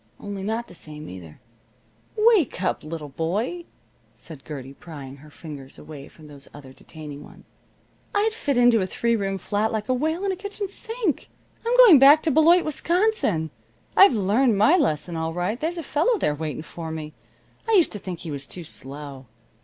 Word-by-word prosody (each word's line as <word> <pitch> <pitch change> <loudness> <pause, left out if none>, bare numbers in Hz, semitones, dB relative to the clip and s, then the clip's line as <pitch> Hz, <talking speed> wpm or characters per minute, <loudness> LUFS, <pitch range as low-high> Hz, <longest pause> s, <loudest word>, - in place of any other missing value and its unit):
Only 200 -1 -6
not 225 +4 -3
the - - -14
same, 155 -3 -11
either." 85 -4 -11 0.8
"Wake 425 - +3
up, - - -1
little 155 -1 -6
boy," 205 - -3 0.5
said 155 -5 -12
Gertie, 135 -3 -8
prying 140 -4 -10
her 150 +2 -15
fingers 145 -3 -10
away 150 -2 -10
from 155 - -17
those 140 -2 -12
other 135 -2 -12
detaining 150 0 -10
ones. - - -18 0.6
"I'd 430 +2 +2
fit 285 - -1
into 240 -3 +5
a 185 - -1
three 235 +4 0
room 195 -2 -2
flat 210 +4 -1
like 220 +1 -3
a - - +3
whale 315 +8 -1
in 390 - +1
a - - -2
kitchen 405 +1 -5
sink. 440 - -3 0.3
I'm 475 +2 +1
going 445 - +9
back 285 +3 +7
to 320 - +1
Beloit, 330 +5 +5
Wisconsin. 310 - 0 0.4
I've 390 -7 +8
learned 215 +3 +2
my 215 - +5
lesson 175 - 0
all 160 0 -2
right. 180 +7 -2
There's 335 +3 -2
a 335 - -4
fellow 320 - +1
there 150 - 0
waiting 155 0 -5
for 165 0 -8
me. 155 -1 -6 0.6
I - - +3
used 365 -6 +4
to 210 - -5
think 180 -3 -7
he 165 - -6
was 140 -1 -6
too 180 - -6
slow. 140 -2 -7
195 Hz, 185 wpm, -24 LUFS, -, 0.8 s, going